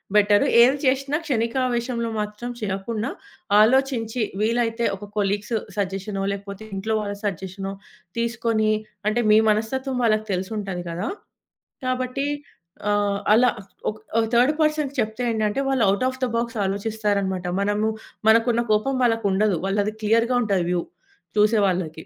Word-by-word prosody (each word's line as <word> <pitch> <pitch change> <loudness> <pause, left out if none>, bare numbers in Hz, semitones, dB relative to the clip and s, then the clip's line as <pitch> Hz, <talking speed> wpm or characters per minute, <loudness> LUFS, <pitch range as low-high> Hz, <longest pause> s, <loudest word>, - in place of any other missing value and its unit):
Better. 205 0 +5 0.2
ఏది 260 +4 +5
చేషినా 275 +2 +1
క్షణికావేశంలో 235 -2 0
మాత్రం 210 +3 -4
చెయ్యకుండా, 215 +4 -3 0.5
ఆలోచించి, 245 -1 +2 0.2
వీలైతే 230 +1 +1
ఒక 205 +2 -9
కొలీగ్స్ 205 +3 0 0.2
సజెషనో, 195 0 -2
లేకపోతే 200 +1 -6
ఇంట్లో 220 +3 -2
వాళ్ళ 205 -1 -4
సజెషనో 195 0 -4 0.5
తీసుకొనీ, 230 -2 0 0.4
అంటే, 240 +3 +1
మీ 215 - +7
మనస్తత్వం 255 +5 0
వాళ్ళకి 215 -1 +2
తెలిసుంటది 190 -1 -3
గదా! 175 +5 -3 0.8
కాబట్టి, 255 +2 -1 0.6
ఆహ్, 205 -1 +1
అలా 245 +2 +5 0.4
ఒక్ 215 - -13 0.2
ఆహ్, 225 - +1
థర్డ్ 250 +5 +5
పర్సన్‌కి 305 -2 +1
చెప్తే 220 +3 -3
ఏంటంటే, 215 +3 0
వాళ్ళు 250 -5 +3
ఔట్ 230 +6 0
ఆఫ్ 260 0 -9
ద - - -1
బాక్స్ 235 -1 -2
ఆలోచిస్తారనమాట. 200 -2 -1
మనము 205 +2 +1 0.4
మనకున్న 230 +1 +4
కోపం 260 +6 +1
వాళ్ళకుండదు, 210 -5 +2
వాళ్ళది 205 +2 0
క్లియర్‌గా 230 +3 +3
ఉంటది 195 -5 +1
వ్యూ 175 -1 0 0.5
చూసే 210 +1 +4
వాళ్ళకి. 170 -4 -2
220 Hz, 130 wpm, -23 LUFS, 200-240 Hz, 0.8 s, మీ